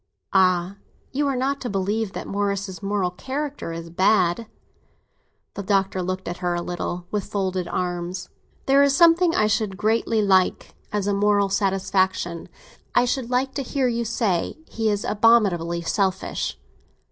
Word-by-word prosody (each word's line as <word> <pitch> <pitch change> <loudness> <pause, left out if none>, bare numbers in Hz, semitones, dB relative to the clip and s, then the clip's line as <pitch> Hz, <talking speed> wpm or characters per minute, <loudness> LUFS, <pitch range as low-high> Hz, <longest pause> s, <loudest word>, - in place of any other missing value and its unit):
"Ah, 185 0 +3 0.3
you 285 +2 0
are 275 - 0
not 270 +2 -1
to 245 - -3
believe 200 +1 -1
that - - -5
Morris's 200 -1 -2
moral 195 -2 0
character 270 - -4
is 165 0 -7
bad!" 185 +3 +2 1.1
The - - -5
Doctor 195 -1 +1
looked 185 +1 -3
at 175 - -4
her 175 -1 -1
a 175 - -2
little, 175 0 -4
with 205 -2 -1
folded 190 -3 -2
arms. 180 0 -3 0.4
"There 275 +1 +5
is 280 -1 +4
something 335 +1 +5
I 215 - +3
should 210 -2 0
greatly 220 +1 +1
like—as 195 +1 0
a 205 - +1
moral 205 0 +2
satisfaction. 190 -3 0 0.5
I - - +5
should 250 -1 -2
like 260 +2 0
to 280 - -2
hear 265 0 0
you 235 -1 0
say—'He 225 - -1
is 205 -1 -1
abominably 195 -7 +3
selfish! 190 +1 -1
200 Hz, 145 wpm, -23 LUFS, 185-230 Hz, 1.1 s, There